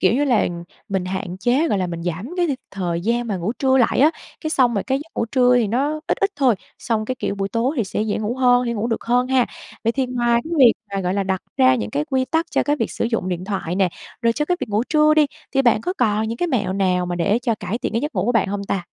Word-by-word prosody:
Kiểu 185 Hz, -, +4 dB
như 290 Hz, +3 st, +2 dB
là 245 Hz, -6 st, +2 dB, 0.4 s
mình 190 Hz, -3 st, -1 dB
hạn 185 Hz, -1 st, -4 dB
chế, 255 Hz, -, +2 dB
gọi 200 Hz, -, +1 dB
là, 185 Hz, -, 0 dB
mình 170 Hz, -1 st, -5 dB
giảm 180 Hz, +7 st, -3 dB
cái 350 Hz, -1 st, +2 dB
đi 285 Hz, -, 0 dB, 0.2 s
thời 175 Hz, -3 st, -2 dB
gian 235 Hz, +5 st, 0 dB
mà 205 Hz, -4 st, -2 dB
ngủ 180 Hz, +6 st, -2 dB
trưa 265 Hz, -1 st, +3 dB
lại 240 Hz, -, +3 dB
á. 300 Hz, +4 st, +6 dB, 0.3 s
Cái 310 Hz, -, -3 dB
xong 250 Hz, -6 st, +3 dB
rồi 200 Hz, -, 0 dB
cái 265 Hz, +1 st, 0 dB
giấc 310 Hz, +3 st, -10 dB
ngủ -, -, 0 dB
trưa 250 Hz, +1 st, +4 dB
thì 235 Hz, -3 st, +2 dB
nó 285 Hz, +7 st, 0 dB
ít -, -, 0 dB
ít 395 Hz, 0 st, +2 dB
thôi, 260 Hz, -5 st, +4 dB, 0.2 s
xong 220 Hz, -2 st, -1 dB
cái, 255 Hz, -, -2 dB
kiểu, 200 Hz, -, -3 dB
buổi 195 Hz, 0 st, -2 dB
tối 240 Hz, +7 st, 0 dB
thì 230 Hz, -, +1 dB
sẽ 200 Hz, +2 st, -2 dB
dễ 215 Hz, -1 st, -1 dB
ngủ 220 Hz, +3 st, -2 dB
hơn, 250 Hz, -1 st, +4 dB
dễ 235 Hz, -, 0 dB
ngủ 225 Hz, +1 st, -2 dB
được 225 Hz, -, -2 dB
hơn 245 Hz, +2 st, +2 dB
ha. 260 Hz, -2 st, +3 dB, 0.4 s
Vậy 230 Hz, -, +2 dB
thì 265 Hz, 0 st, 0 dB
ngoài 240 Hz, -1 st, +1 dB
cái 335 Hz, -, -6 dB
việc 245 Hz, -4 st, +8 dB, 0.2 s
mà, 195 Hz, -, 0 dB
gọi 180 Hz, 0 st, -1 dB
là, 200 Hz, -, +1 dB
đặt 190 Hz, -1 st, -2 dB
ra 130 Hz, 0 st, +5 dB
những 105 Hz, -3 st, -3 dB
cái 145 Hz, +1 st, -1 dB
quy 260 Hz, +5 st, 0 dB
tắc 325 Hz, +4 st, 0 dB
cho -, -, +2 dB
cái 290 Hz, 0 st, +1 dB
việc -, -, -2 dB
sử -, -, -2 dB
dụng 225 Hz, -5 st, -1 dB
điện 180 Hz, 0 st, -3 dB
thoại 190 Hz, -4 st, -3 dB
nè, 190 Hz, -2 st, +3 dB, 0.3 s
rồi 230 Hz, 0 st, +3 dB
cho 300 Hz, +5 st, -1 dB
cái 360 Hz, +2 st, 0 dB
việc 245 Hz, -, -3 dB
ngủ 210 Hz, +2 st, +1 dB
trưa 305 Hz, 0 st, +4 dB
đi, 305 Hz, -2 st, +5 dB, 0.3 s
thì 270 Hz, 0 st, +3 dB
bạn 235 Hz, -3 st, +3 dB
có 360 Hz, -, -2 dB
còn 220 Hz, -2 st, +1 dB
những 230 Hz, -, -3 dB
cái 350 Hz, -, +1 dB
mẹo 205 Hz, -9 st, 0 dB
nào 185 Hz, -2 st, +1 dB
mà 175 Hz, 0 st, -3 dB
để 200 Hz, +6 st, +2 dB
cho 230 Hz, -3 st, +1 dB
cải 210 Hz, +3 st, -4 dB
thiện -, -, -3 dB
cái 230 Hz, -, 0 dB
giấc 295 Hz, +3 st, -4 dB
ngủ -, -, 0 dB
của 245 Hz, -, +1 dB
bạn 215 Hz, -4 st, +2 dB
hông 200 Hz, 0 st, -3 dB
ta? 190 Hz, -3 st, -2 dB
230 Hz, 300 wpm, -21 LUFS, 195-260 Hz, 0.4 s, việc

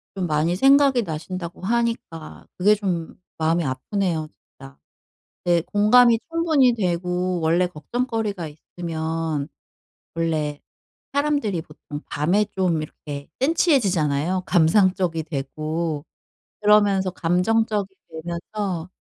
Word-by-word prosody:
좀 185 Hz, -2 st, -2 dB
많이 155 Hz, +3 st, +1 dB
생각이 270 Hz, 0 st, +5 dB
나신다고 170 Hz, +1 st, -6 dB
하니까 230 Hz, -7 st, -2 dB
그게 205 Hz, +4 st, +5 dB
좀 180 Hz, -6 st, -3 dB, 0.2 s
마음이 165 Hz, +2 st, +2 dB
아프네요 160 Hz, +5 st, -2 dB, 0.3 s
진짜. 70 Hz, +1 st, -12 dB, 0.7 s
네 175 Hz, -1 st, +3 dB
공감이 225 Hz, +5 st, +5 dB
충분히 315 Hz, -7 st, +3 dB
되고 180 Hz, -2 st, -1 dB
원래 170 Hz, +3 st, +2 dB
걱정거리가 205 Hz, -, -3 dB
있으면 160 Hz, -1 st, -4 dB, 0.7 s
원래 155 Hz, -3 st, -1 dB, 0.5 s
사람들이 285 Hz, -, 0 dB
보통 150 Hz, -1 st, -9 dB
밤에 175 Hz, +9 st, +1 dB
좀 180 Hz, -4 st, +1 dB
이렇게 145 Hz, -1 st, -8 dB
센티해지잖아요. 185 Hz, -, +2 dB
감상적이 180 Hz, -1 st, +3 dB
되고. 155 Hz, +1 st, -3 dB, 0.6 s
그러면서 205 Hz, -2 st, +4 dB
감정적이 195 Hz, +3 st, 0 dB
되면서 170 Hz, +2 st, -4 dB
180 Hz, 260 characters per minute, -23 LUFS, 160-210 Hz, 0.7 s, 생각이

